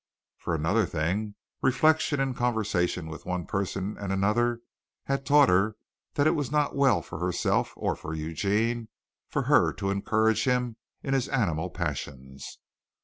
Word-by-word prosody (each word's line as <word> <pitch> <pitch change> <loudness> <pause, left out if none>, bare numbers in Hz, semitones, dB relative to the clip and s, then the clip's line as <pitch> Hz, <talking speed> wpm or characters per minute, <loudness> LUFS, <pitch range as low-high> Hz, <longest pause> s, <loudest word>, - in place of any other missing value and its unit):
For 85 - -2
another 95 +9 +1
thing, 95 +7 -2 0.3
reflection 155 +2 +3
and 135 -2 0
conversation 110 - 0
with 80 0 -9
one 90 -2 -2
person 100 +1 -3
and 100 -2 -3
another 115 +5 +1 0.4
had 135 0 -2
taught 145 -1 +6
her 100 +4 +3 0.4
that 145 - +2
it 155 - +5
was 145 -6 -2
not 150 -1 +1
well 140 -2 +3
for - - -8
herself 90 0 0
or - - -1
for 80 - -6
Eugene 105 +9 -1 0.4
for - - -1
her - - +4
to 100 - -2
encourage 110 +3 +1
him 125 -3 0 0.3
in 135 - -1
his 135 0 0
animal 90 -9 0
passions. 70 -5 -6
105 Hz, 150 wpm, -27 LUFS, 90-125 Hz, 0.4 s, taught